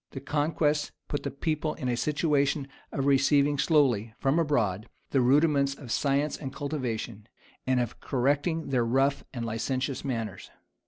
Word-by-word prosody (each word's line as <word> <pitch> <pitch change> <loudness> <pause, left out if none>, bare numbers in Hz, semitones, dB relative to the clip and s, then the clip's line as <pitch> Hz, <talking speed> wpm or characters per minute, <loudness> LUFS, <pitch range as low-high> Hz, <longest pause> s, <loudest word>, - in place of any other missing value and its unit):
[] - - -47
The 135 - -5
conquest 150 +1 0
put 145 - -2
the - - -3
people 155 +1 -2
in 130 - -4
a 125 - +1
situation 145 0 +1 0.2
of 135 - -2
receiving 140 +1 +3
slowly, 120 - +2
from 140 +5 +2
abroad, 115 - 0 0.2
the 135 - +3
rudiments 140 +1 +3
of 135 -5 -9
science 140 +1 +1
and 135 -3 -6
cultivation, 120 -7 -4 0.4
and 130 -1 +3
of 120 -2 -3
correcting 145 +5 0
their 125 -3 +2
rough 135 +4 +1
and 120 -2 -4
licentious 130 +4 -2
manners. 115 -7 -4
140 Hz, 155 wpm, -28 LUFS, 125-145 Hz, 0.4 s, receiving